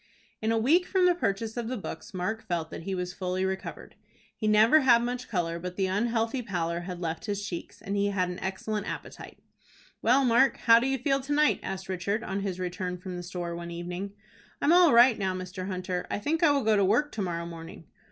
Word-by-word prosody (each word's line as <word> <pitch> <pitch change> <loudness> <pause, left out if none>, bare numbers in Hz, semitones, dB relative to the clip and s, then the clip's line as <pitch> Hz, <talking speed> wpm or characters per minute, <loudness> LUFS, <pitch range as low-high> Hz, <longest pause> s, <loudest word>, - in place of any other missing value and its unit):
In 220 +1 +1
a 225 - +2
week 315 +11 +3
from 375 -2 +2
the 360 - +5
purchase 225 - -2
of 235 -2 -2
the 255 +1 -3
books, 165 +2 -7
Mark 215 +4 -3
felt 170 -4 -2
that - - -6
he 190 +3 -3
was 180 0 -3
fully 185 0 -2
recovered. 190 0 -5 0.4
He 215 - -2
never 220 +8 +6
had 235 -3 +5
much 250 +1 -3
color, 170 -4 -1
but 180 +1 -6
the 195 - +1
unhealthy 225 +5 0
pallor 170 -6 -2
had 175 0 -6
left 165 -2 -4
his 205 -1 -2
cheeks, 170 -3 -7
and 200 - -3
he 200 0 +2
had 190 -3 0
an 180 +1 -5
excellent 205 +2 -3
appetite. - - -7 0.6
"Well, 260 +4 +4
Mark, 250 +3 +4
how 230 0 +8
do 250 - 0
you 270 0 +1
feel 275 +2 +1
to 280 +2 -3
night?" 300 +1 +3
asked 190 0 -5
Richard, 200 +4 -2
on 195 +1 -3
his 195 -2 -3
return 180 0 -3
from 185 0 -7
the 175 - -5
store 175 -1 -5
one 170 0 -6
evening. 175 +3 -5 0.5
"I'm 310 - +4
all 350 -3 +7
right, 235 0 +6
now, 190 -2 -1
Mr. 185 0 -6
Hunter. 185 -1 -3
I - - -1
think 305 +10 -1
I 330 - +6
will 280 -2 +2
go 220 0 +3
to 200 - +3
work 240 +10 +2
to 215 - -4
morrow 170 -3 -2
morning." 165 0 -9
200 Hz, 230 wpm, -28 LUFS, 180-235 Hz, 0.6 s, how